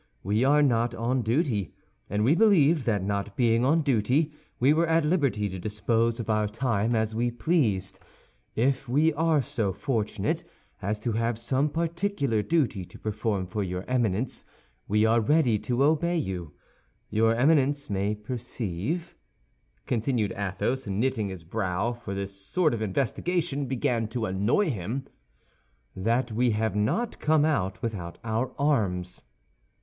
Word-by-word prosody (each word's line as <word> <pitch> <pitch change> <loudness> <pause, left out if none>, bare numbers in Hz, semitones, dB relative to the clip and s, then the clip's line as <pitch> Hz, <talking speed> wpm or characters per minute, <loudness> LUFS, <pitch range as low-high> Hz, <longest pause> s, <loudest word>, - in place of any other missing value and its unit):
We 105 +5 +1
are 145 +2 +5
not 120 -3 +2
on 125 +3 0
duty, 115 - 0 0.3
and 105 +2 0
we 130 +7 +5
believed 170 - +4
that 105 -4 +1
not 100 +1 -3
being 115 -1 +3
on 155 +5 +3
duty 140 +4 +1 0.3
we 135 +4 +5
were 165 +2 +2
at 165 -1 +3
liberty 140 - +1
to 95 0 -6
dispose 115 +4 0
of 115 - -4
our 105 -1 +1
time 115 0 0
as 110 0 0
we 120 +2 0
pleased. 115 - 0 0.6
If 130 +2 0
we 150 +5 +3
are 160 -1 +2
so 110 -6 -1
fortunate 110 -1 -2 0.4
as 105 +2 -2
to 120 - -1
have 115 +1 0
some 130 +5 0
particular 165 - -1
duty 130 - 0
to - - -13
perform 105 -2 -2
for 100 +4 -3
your 90 -1 -3
Eminence, 120 -2 0 0.4
we 105 +2 +3
are 115 +1 +4
ready 120 -3 +3
to 125 +4 0
obey 160 +4 +2
you. 90 - -4 0.6
Your 115 +1 +3
Eminence 140 +2 +2
may 100 +1 -1
perceive," 115 - -4 0.7
continued 115 -3 0
Athos, 100 +6 -2
knitting 105 +1 0
his 95 -3 -8
brow, 95 +4 -1
for 115 -5 -7
this 100 0 -4
sort 110 - 0
of 115 - -3
investigation 140 - -1
began 125 -3 0
to 115 0 -3
annoy 105 - +1
him, 115 +6 -4 0.9
"that 115 +5 0
we 120 +3 +2
have 110 -2 0
not 160 - 0
come 155 -1 +3
out 100 -9 -1
without 95 -7 -4
our 115 +3 -1
arms." 100 -11 0
115 Hz, 150 wpm, -27 LUFS, 105-140 Hz, 0.9 s, are